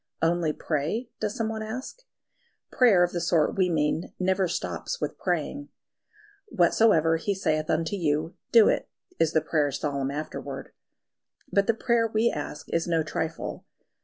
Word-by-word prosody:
"Only 165 -1 +2
pray?" 165 - -2
does 210 +1 -2
someone 220 -2 -2
ask? 230 - -6 0.7
Prayer 215 -8 +5
of 175 - +1
the 175 - -2
sort 170 -2 +2
we 185 -2 +2
mean 155 0 0
never 190 0 +1
stops 90 - -3
with - - -4
praying. 180 - -2 0.8
"Whatsoever 170 - +3
He 200 +5 -1
saith 155 -5 -1
unto 160 +4 0
you, 160 -1 -1 0.2
do 230 -3 +7
it," - - 0 0.3
is 165 -1 +2
the 160 - +3
prayer's 150 -3 0
solemn 140 -2 -1
afterword; 150 +2 -6 0.8
but 200 -1 +2
the 230 - +3
prayer 230 0 +2
we 225 +1 +2
ask 150 0 -6
is 165 0 +1
no 165 -2 +2
trifle. 160 +1 -4
170 Hz, 150 wpm, -27 LUFS, 155-215 Hz, 0.8 s, do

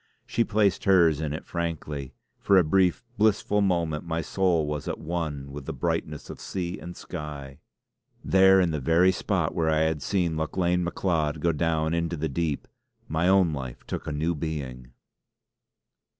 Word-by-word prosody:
She 115 - +1
placed 105 -4 +1
hers 85 -6 +4
in 75 -2 -2
it 75 - -5
frankly; 80 -5 -4 0.2
for 100 - +4
a 90 - +6
brief, 90 +6 +2 0.2
blissful 105 -1 +2
moment 85 -6 0
my 85 -1 -2
soul 90 -4 +1
was 75 -1 -4
at - - -2
one 80 -4 -4
with 70 -1 -8
the - - -3
brightness 75 -1 -2
of - - -9
sea 90 -2 -4
and 90 0 -9
sky. 75 -5 -7 0.7
There, 95 0 +6
in 90 -3 +2
the 75 - -2
very 85 +7 +4
spot 95 - -1
where 80 -1 +1
I 80 0 +2
had 80 -2 0
seen 85 -1 0
Lauchlane 90 +3 0
Macleod 80 -4 -1
go 85 +3 +2
down 80 0 0
into 85 0 -1
the 80 +2 -1
deep, 75 0 -2 0.4
my 80 +3 0
own 95 -4 +4
life 65 -4 -6
took - - -5
a - - -2
new 80 +4 0
being. 70 -6 -5
80 Hz, 170 wpm, -26 LUFS, 75-90 Hz, 0.7 s, a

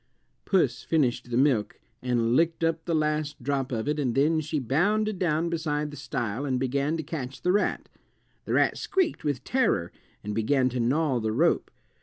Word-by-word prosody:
Puss 135 - +2
finished 125 -6 0
the 120 - -1
milk 130 -6 +2 0.2
and 120 -1 +1
licked 165 +2 +2
up 165 0 0
the 170 - 0
last 150 -3 -1
drop 135 -1 -1
of 115 0 -2
it, 150 0 0
and 125 -5 0
then 155 +4 +3
she 155 0 -3
bounded 195 - +1
down 165 -2 +1
beside 150 -3 -2
the - - -8
stile 120 -3 -3
and 130 -3 0
began 140 +4 0
to 160 - -3
catch 140 -4 -6
the 180 - +3
rat. 205 +2 0 0.6
The - - -2
rat - - +2
squeaked 370 - 0
with 145 -4 -2
terror 255 - +1 0.3
and 105 - -4
began 130 +4 +2
to 125 0 -3
gnaw 130 +2 +1
the 110 -1 -1
rope. 160 +10 +2
145 Hz, 185 wpm, -27 LUFS, 125-160 Hz, 0.6 s, then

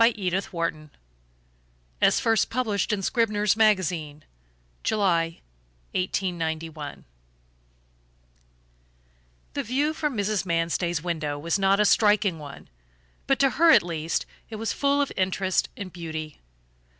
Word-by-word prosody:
MANSTEY'S 195 -5 +1
VIEW 165 -3 -3 1.1
As - - +4
first 225 -2 +2
published 225 -5 -1
in 200 -2 -1
Scribner's 210 -2 +2
Magazine, 175 -9 +1 0.6
July, 170 -6 +1 0.5
1891 165 -5 -3 2.5
The - - -1
view 285 +6 0
from 300 -6 -2
Mrs. 205 0 0
Manstey's 170 -1 -1
window 155 -4 -2
was 165 +6 -1
not 195 +1 +3
a 210 - +4
striking 205 -5 +3
one, 145 -2 -10 0.6
but 275 - +3
to 275 -1 +3
her 335 +2 +4
at - - +7
least 165 -2 -2 0.2
it 225 - -6
was 215 -1 -2
full 285 0 +2
of 280 - -5
interest 190 0 0
and 185 -3 -7
beauty. 160 -3 -6
190 Hz, 115 wpm, -25 LUFS, 165-215 Hz, 2.5 s, at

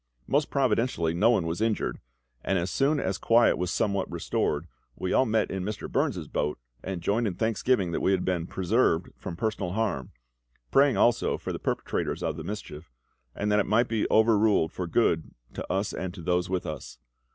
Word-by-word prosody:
Most 145 +2 +1
providentially 115 - +1
no 100 +7 +4
one 110 -8 +2
was 80 +5 -3
injured; 110 -1 0 0.4
and 95 - +1
as 90 +1 -1
soon 145 +2 +2
as 95 -6 -2
quiet 115 +1 +4
was 90 0 -2
somewhat 100 0 0
restored, 75 +3 -1 0.3
we 95 - -2
all 130 - +4
met 110 -1 +1
in 95 -1 -3
Mr. 105 +2 -4
Burns's - - -1
boat 75 0 -1 0.3
and 90 -3 -4
joined 110 +5 +1
in 95 - -3
thanksgiving 110 -2 +1
that - - -1
we - - +2
had 95 -2 +1
been 90 -2 -1
preserved 95 -2 +1
from 85 - -7
personal 105 -3 -2
harm, 95 - -1 0.6
praying 140 -1 +4
also 120 - +3
for - - -5
the - - -4
perpetrators - - -2
of - - -1
the - - -6
mischief, 80 - -7 0.4
and 105 +1 -1
that 105 - +4
it 100 - +1
might 115 +4 +3
be 110 -2 0
over 110 -1 +4
ruled 100 -7 +3
for 90 - -4
good 85 -4 +1 0.2
to - - -5
us 100 +2 -1
and 90 0 -4
to 85 - -9
those 90 0 0
with 95 -1 -1
us. 65 -5 -6
100 Hz, 195 wpm, -27 LUFS, 90-115 Hz, 0.6 s, no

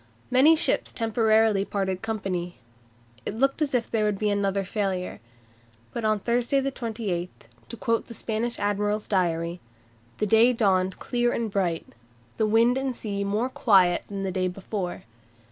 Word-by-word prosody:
Many 275 +6 +6
ships 320 - 0
temporarily 220 -2 +2
parted 190 -2 -2
company. 190 -6 -3 0.7
It - - -4
looked 275 +6 +1
as 285 -4 +1
if 235 -2 -1
there 220 -2 +1
would 210 -1 +1
be 210 +1 0
another 200 -1 0
failure. 190 -2 -2 0.7
But 235 - -4
on 215 0 +3
Thursday 240 +5 +1
the 275 0 -1
28th 215 -8 -3 0.4
(to 235 - -7
quote 230 +1 0
the 235 - -9
Spanish 230 +2 -2
admiral's 205 +1 -1
diary) 170 -3 0 0.6
"the 215 - 0
day 225 +4 +5
dawned 190 -5 +1
clear 240 -1 0
and 230 -3 -2
bright, 180 -5 -1 0.5
the 220 - +2
wind 230 +4 +4
and 265 -2 -2
sea 200 -3 -3
more 210 +5 0
quiet 190 -8 +3
than 200 -1 -5
the 190 - -1
day 185 0 0
before. 185 0 -5
210 Hz, 160 wpm, -26 LUFS, 195-235 Hz, 0.7 s, Many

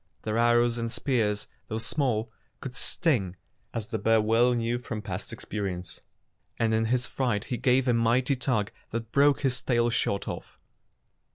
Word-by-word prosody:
Their 110 +1 0
arrows 120 0 +3
and 115 0 -2
spears, 110 -7 0 0.2
though 110 - -3
small, 115 -3 0 0.3
could 130 -2 -7
sting, 120 - 0 0.4
as 115 0 -4
the 110 -2 -2
bear 110 +2 +4
well 115 +3 +3
knew 120 +1 0
from 110 -3 -5
past 95 -1 -5
experience, 95 -3 -5 0.6
and 110 -1 +1
in 110 0 +2
his 125 +2 +1
fright 120 -6 -1
he 125 - -3
gave 130 +1 +2
a 125 - +4
mighty 120 +4 +2
tug 125 -5 0 0.2
that 115 0 -4
broke 140 0 +4
his 130 -2 0
tail 120 -1 +2
short 100 -3 0
off. - - -7
115 Hz, 165 wpm, -28 LUFS, 110-125 Hz, 0.6 s, bear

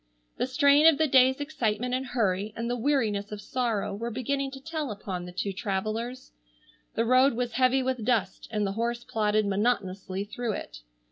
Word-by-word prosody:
The - - 0
strain 285 +3 +5
of 320 -3 +6
the 315 - +3
day's 265 -1 +5
excitement 250 -5 -1
and 260 +1 0
hurry 215 -5 -1
and 230 +1 -3
the 245 - 0
weariness 225 -6 0
of 210 - -5
sorrow 225 -4 -1
were 230 +4 -4
beginning 270 +4 -2
to 270 0 -9
tell 310 0 -4
upon 190 -4 -5
the - - -8
two 190 +2 -3
travellers. 215 +5 -3 0.6
The 230 - +1
road 255 +3 +5
was 245 0 -1
heavy 255 +2 +3
with 255 -3 -2
dust 210 -6 0
and 210 -2 -1
the 195 - -1
horse 235 +3 -2
plodded 215 -3 +1
monotonously 195 -2 -1
through 225 +2 -3
it. - - -7
235 Hz, 185 wpm, -27 LUFS, 205-260 Hz, 0.6 s, of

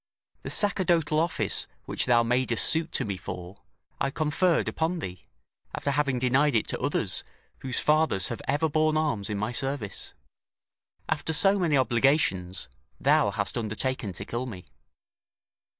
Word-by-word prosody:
The - - -6
sacerdotal 170 -7 +2
office 165 +1 0 0.2
which - - -1
thou 120 -1 +4
madest 120 -1 +2
suit 160 0 +2
to - - 0
me 100 -3 -3
for, 90 +1 -8 0.4
I 135 - +1
conferred 160 +4 +1
upon 165 +3 -1
thee, 90 - -7 0.5
after 140 - -2
having 140 -2 0
denied 130 +3 +2
it 110 - +1
to - - -2
others, - - 0 0.4
whose 130 -2 -3
fathers 150 - +2
have 120 - -5
ever 145 +4 +1
borne 155 0 +1
arms 115 -11 -1
in 105 - -2
my 110 +3 -2
service. 130 -5 -3 0.9
After 160 0 -1
so 195 +5 +4
many 160 -6 +2
obligations, 120 - +1 0.3
thou - - +3
hast - - -2
undertaken 110 0 -2
to 100 +3 -7
kill 120 +3 -4
me." 95 -7 -9
135 Hz, 150 wpm, -27 LUFS, 110-155 Hz, 0.9 s, thou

